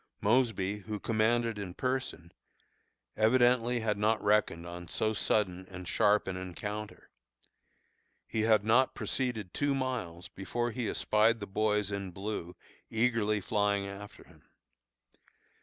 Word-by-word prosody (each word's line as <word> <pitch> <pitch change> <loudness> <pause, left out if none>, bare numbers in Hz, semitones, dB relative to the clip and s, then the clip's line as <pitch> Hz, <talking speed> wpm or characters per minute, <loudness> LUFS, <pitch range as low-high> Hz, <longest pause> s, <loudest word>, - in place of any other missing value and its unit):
Mosby, 105 -3 +1
who 105 +1 -5
commanded 115 +1 +1
in 95 -3 -6
person, 125 -10 -3 0.8
evidently 120 +1 +3
had 105 -2 -1
not 110 +1 +2
reckoned 105 -5 +2
on 85 0 -8
so 110 +4 0
sudden 95 -4 0
and 90 -1 -8
sharp 105 +2 +3
an 95 - -2
encounter. 105 +4 -6 1.1
He 110 - -2
had 110 -2 +3
not 125 +4 +3
proceeded 110 -8 -2
two 145 -1 +1
miles 115 -11 -3
before 120 +5 -3
he 115 0 -2
espied 110 +2 +2
the 100 - -5
boys 105 0 0
in 100 -1 -3
blue 95 -2 -5 0.3
eagerly 110 -2 +1
flying 100 -1 +1
after 100 +1 -9
him. - - -21
105 Hz, 125 wpm, -31 LUFS, 100-115 Hz, 1.1 s, evidently